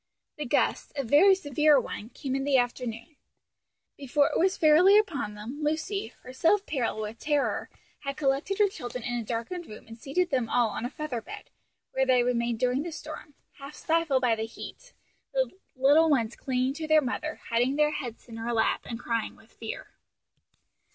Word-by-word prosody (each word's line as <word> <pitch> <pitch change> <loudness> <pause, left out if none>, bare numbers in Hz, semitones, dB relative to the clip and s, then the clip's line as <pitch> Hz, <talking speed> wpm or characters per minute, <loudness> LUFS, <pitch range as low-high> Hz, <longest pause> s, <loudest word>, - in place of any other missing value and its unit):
The 300 -3 -4
gust, - - 0
a 275 - -1
very 305 - +6
severe 300 -3 +3
one, 225 -2 -6
came 265 0 -4
in 270 - -1
the 275 -1 +3
afternoon. 245 +3 -3 0.8
Before 285 +1 +1
it - - +1
was 375 +2 +2
fairly 340 +6 +6
upon 285 - 0
them, 225 +8 -7
Lucy, 315 - -1 0.2
herself 330 +11 +1
pale 245 -7 -2
with 215 +1 -5
terror, 295 -2 0 0.3
had 275 -1 -5
collected 285 +7 0
her 415 - +5
children 250 - -6
in 245 0 -2
a - - -4
darkened 235 - -4
room 215 - -11
and 225 +1 -12
seated 345 +8 -1
them 250 -4 0
all 240 -2 +3
on 225 - -4
a - - -2
feather 290 -6 -4
bed, - - -10 0.4
where 265 0 +1
they 250 -2 +4
remained 235 -1 0
during 250 +3 +1
the 340 +2 -5
storm, 305 -2 -9 0.2
half 275 +2 -9
stifled 320 -5 +1
by 240 -2 +4
the 220 0 -3
heat, - - -10 0.4
the - - +1 0.2
little 290 +5 +5
ones 240 -6 +1
clinging 255 0 -1
to 315 +2 -5
their 310 0 +6
mother, 300 +4 -3
hiding 245 +4 +2
their 300 0 +3
heads 245 -6 -6
in 230 -1 -9
her 230 +1 -3
lap 225 - +1
and 230 - -5
crying 230 -2 -2
with 225 - -21
fear. 225 -1 -7
270 Hz, 185 wpm, -28 LUFS, 240-310 Hz, 0.8 s, very